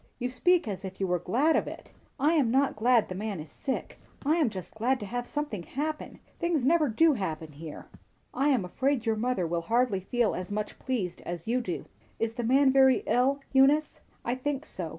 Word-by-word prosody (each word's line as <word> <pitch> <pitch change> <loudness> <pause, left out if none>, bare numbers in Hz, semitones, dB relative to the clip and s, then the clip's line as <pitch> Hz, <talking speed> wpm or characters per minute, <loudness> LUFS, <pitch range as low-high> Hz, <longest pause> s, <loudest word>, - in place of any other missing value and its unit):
"You 250 +1 -3
speak 355 +4 +2
as 200 -2 -4
if 190 -1 -7
you 195 - +1
were 180 -1 0
glad 250 - +2
of - - +1
it." - - -9 0.3
"I 295 +5 +3
am 285 -8 +3
not 270 +3 +2
glad 235 +1 +3
the - - -5
man 200 -1 -4
is 150 -1 -9
sick. 265 - -4 0.3
I 310 +4 +3
am 305 -8 +3
just 185 -4 -8
glad 250 +4 0
to - - -4
have 245 +4 -4
something 295 -10 -3
happen. 300 - -4 0.2
Things 340 -7 0
never 310 -1 +4
do 315 +8 +4
happen 160 - -4
here." 150 +1 -9 0.5
"I 275 - +1
am 255 -10 +2
afraid 260 +6 0
your 225 -1 +2
mother 235 -4 0
will 170 +1 -1
hardly 230 +2 +1
feel 230 +4 0
as 185 +1 -5
much 210 +1 -4
pleased 215 -9 -3
as 170 -1 -5
you 245 +3 +1
do. 180 -7 -4 0.3
Is 225 0 -1
the 240 0 -4
man 265 +3 +4
very 265 -1 +5
ill, 270 +3 +2
Eunice?" 280 +3 +4 0.2
"I 240 - 0
think 280 +3 -3
so. 175 -3 -5
245 Hz, 210 wpm, -28 LUFS, 195-275 Hz, 0.5 s, very